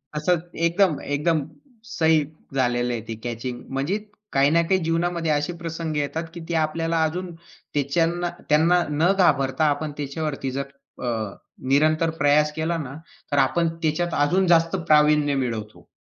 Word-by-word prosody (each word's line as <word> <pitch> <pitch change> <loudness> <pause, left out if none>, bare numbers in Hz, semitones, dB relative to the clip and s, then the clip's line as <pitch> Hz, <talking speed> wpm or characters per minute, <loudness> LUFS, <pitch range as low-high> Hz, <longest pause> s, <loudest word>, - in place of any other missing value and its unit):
असं 160 +4 +2 0.3
एकदम 170 -3 +2
एकदम 150 +3 0 0.5
सही 160 -4 +3 0.4
झालेलं 120 -2 +1
आहे 115 - -3
ते 115 - -4
कॅचिंग. 120 +1 -4
म्हणजे 140 +9 0 0.4
काही 140 +1 +4
ना 165 +2 +4
काही 185 +3 +1
जीवनामध्ये 165 0 0
असे 150 +3 0
प्रसंग 165 -2 -4
येतात, 145 +3 -2
की 175 - -7
ती - - -1
आपल्याला 165 +1 -1
अजून 175 +3 -2
त्याच्यांना 165 +1 -2 0.2
त्यांना 165 +4 +4
न 155 +5 +2
घाबरता 135 -5 +3
आपण 150 +1 -5
त्याच्यावरती 145 -1 -3
जर 140 - 0 0.4
अ, - - 0 0.6
निरंतर 155 +4 +3
प्रयास 150 +1 +4
केला 160 +2 -1
ना 140 -5 -6 0.4
तर 145 - +1
आपण 135 +5 +3 0.2
त्याच्यात 165 +2 0
अजून 185 +4 +2
जास्त 165 +1 +4
प्रावीण्य 150 -1 +4
मिळवतो. 115 -5 -4
155 Hz, 145 wpm, -24 LUFS, 140-170 Hz, 0.6 s, काही